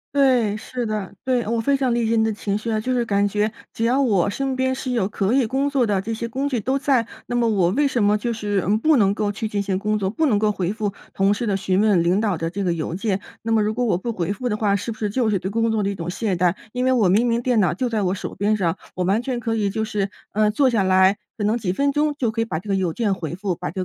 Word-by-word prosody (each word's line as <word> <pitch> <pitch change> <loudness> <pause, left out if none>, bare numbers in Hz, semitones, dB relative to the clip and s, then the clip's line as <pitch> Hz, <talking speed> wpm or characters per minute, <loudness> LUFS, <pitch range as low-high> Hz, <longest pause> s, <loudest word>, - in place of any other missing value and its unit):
对， 245 -7 +3
是 245 +2 -5
的， 210 -3 -3
对。 250 -4 0
我 230 0 0
非 280 +3 +2
常 255 -3 +1
理 235 -1 +1
解 225 +1 +1
你 220 - +3
的 220 - 0
情 205 0 -2
绪 230 +2 -5
啊， 220 - +1
就 255 +3 -1
是 240 -1 +1
感 200 -1 +2
觉 210 +2 +1 0.2
只 225 - -1
要 260 +4 +3
我 200 -8 +2
身 270 +3 -2
边 260 0 +1
是 260 -1 -4
有 225 -6 +1
可 200 0 -1
以 260 -2 +3
工 270 +5 0
作 265 -5 +1
的 195 -2 +1
这 225 +3 -4
些 230 +1 -4
工 270 +4 -2
具 245 -4 0
都 260 +6 0
在， 265 -5 +1 0.2
那 240 - -3
么 235 -1 +2
我 190 -5 +2
为 285 +6 +2
什 240 -5 0
么 205 +1 +3
就 235 +2 -2
是， 205 -3 -1
嗯， 210 +2 +3
不 310 +4 +3
能 200 -2 +3
够 205 -1 0
去 215 +2 -4
进 205 -1 -2
行 195 -2 -1
工 215 +1 0
作， 190 -2 -1
不 315 +9 0
能 220 -8 +3
够 210 0 +2
回 190 0 -2
复 210 -2 -2 0.2
同 195 +1 +2
事 230 +2 -3
的 200 - +1
询 190 0 0
问、 205 -5 +3
领 180 +4 +2
导 205 -6 0
的 165 0 -2
这 195 +2 -3
个 175 - +1
邮 165 0 -3
件？ 195 0 -1 0.2
那 225 0 0
么 215 -1 +3
如 215 +1 0
果 245 +1 -1
我 190 -6 +2
不 235 +5 -3
回 185 -1 -2
复 250 +2 -3
的 210 - -1
话， 205 -2 +2
是 215 +4 -3
不 220 - -8
是 210 -2 -2
就 230 0 +1
是 200 -3 +1
对 190 - -4
工 230 +1 +1
作 220 -1 +1
的 200 - 0
一 200 - -3
种 170 0 -5
懈 195 0 -1
怠？ 175 0 +2 0.2
因 250 0 -1
为 260 - +3
我 225 -7 +3
明 210 +7 +3
明 235 0 +1
电 240 -4 +2
脑 180 - +2
就 250 +7 -1
在 220 -3 -1
我 185 -1 +1
手 195 - -6
边 210 +2 +1
上， 170 -2 0 0.2
我 180 -1 -1
完 205 +5 +2
全 250 -2 -2
可 225 -1 -2
以 205 -2 0
就 220 +2 -2
是， 205 -2 -2 0.2
呃， 210 0 +3
坐 265 +4 +3
下 220 -5 +1
来， 190 +1 +4 0.2
可 205 - -1
能 220 +3 +2
几 195 -6 -2
分 280 +7 +1
钟 300 0 +1
就 235 -4 +1
可 225 +1 -2
以 - - 0
把 160 -7 -3
这 205 - -14
个 195 - +1
邮 185 -3 0
件 205 0 0
回 165 -2 -5
复， 185 -2 -2
把 150 - -5
这 185 - -4
215 Hz, 335 characters per minute, -22 LUFS, 195-240 Hz, 0.2 s, 来